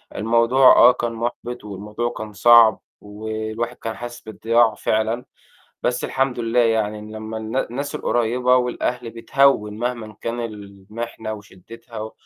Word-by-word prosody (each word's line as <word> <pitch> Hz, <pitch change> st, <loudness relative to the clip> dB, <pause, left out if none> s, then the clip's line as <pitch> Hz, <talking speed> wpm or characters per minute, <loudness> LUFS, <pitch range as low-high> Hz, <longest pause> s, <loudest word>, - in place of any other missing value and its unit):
الموضوع 115 Hz, +4 st, +4 dB
آه، 125 Hz, -, +8 dB
كان 120 Hz, -2 st, -3 dB
مُحبِط 120 Hz, +1 st, -5 dB
والموضوع 105 Hz, +4 st, -4 dB
كان 110 Hz, -1 st, -7 dB
صعب، 115 Hz, +1 st, +6 dB, 0.2 s
والواحد 110 Hz, +3 st, -5 dB
كان 115 Hz, -1 st, -5 dB
حاسس 120 Hz, 0 st, -8 dB
بالضياع 115 Hz, 0 st, +2 dB
فعلًا، 110 Hz, +3 st, -1 dB, 0.6 s
بس 125 Hz, 0 st, 0 dB
الحمد 130 Hz, -2 st, -1 dB
لله 115 Hz, +1 st, +1 dB
يعني 110 Hz, -2 st, +1 dB
إن 105 Hz, 0 st, -10 dB
لمّا 110 Hz, +1 st, -6 dB
النا 110 Hz, +4 st, -3 dB
الناس 140 Hz, +4 st, -4 dB
القريبة 125 Hz, +2 st, +1 dB
والأهل 125 Hz, -1 st, -1 dB
بِتهِّون 115 Hz, -3 st, +1 dB
مهما 115 Hz, -3 st, -4 dB
كان 120 Hz, +1 st, -3 dB
المحنة 110 Hz, +1 st, -7 dB
وشدّتها، 110 Hz, +3 st, -10 dB
115 Hz, 130 wpm, -21 LUFS, 110-120 Hz, 0.6 s, آه